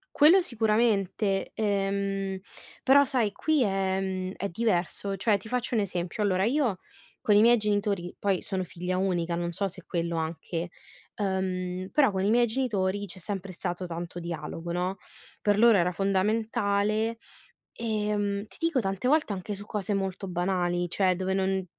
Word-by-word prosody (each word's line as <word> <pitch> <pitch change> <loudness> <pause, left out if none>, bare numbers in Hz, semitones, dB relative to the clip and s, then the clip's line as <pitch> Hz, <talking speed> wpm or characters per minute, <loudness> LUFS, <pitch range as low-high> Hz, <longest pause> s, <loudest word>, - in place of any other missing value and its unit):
Quello 325 +6 +7
sicuramente, 215 - +1
ehm, 195 -2 -1 0.4
però 280 +2 +6
sai 245 -6 +1
qui 305 +5 +1
è 195 -2 0
mhmm, 185 -1 -3
è 200 - -2
diverso. 195 0 -1
Cioè 205 +2 +2
ti 200 +3 -12
faccio 250 +1 -1
un 220 - +3
esempio: 180 +1 -2
allora 190 -2 +2
io 240 -6 +1 0.4
con 210 - +3
i 205 - +7
miei 240 +2 +6
genitori 205 -4 -1
poi 195 -3 0
sono 190 -2 -2
figlia 180 +1 -3
unica, 175 -3 0
non 170 0 -2
so 195 +3 -1
se 185 -1 -9
quello 170 -1 -2
anche 165 +2 -3 0.5
ehm, 185 -2 -2
però 280 -7 +4
con 190 -1 -1
i 200 - +2
miei 240 +1 +4
genitori 205 -5 0
c'è 185 -1 -6
sempre 195 0 -5
stato 175 +1 -4
tanto 175 0 -5
dialogo, 170 0 -5
no. 180 +2 -1 0.4
Per 205 -1 +2
loro 230 -2 +7
era 180 0 +2
fondamentale, 205 +3 +1 0.6
ehm, 210 -2 -1
ti - - -11
dico 330 -5 +2
tante 195 +1 -2
volte 300 -6 +3
anche 200 +2 -4
su 200 +1 -8
cose 210 -1 -2
molto 195 0 -2
banali, 175 0 0
cioè 185 0 +2
dove 190 +1 -1
non 190 0 0
195 Hz, 160 wpm, -28 LUFS, 185-215 Hz, 0.6 s, Quello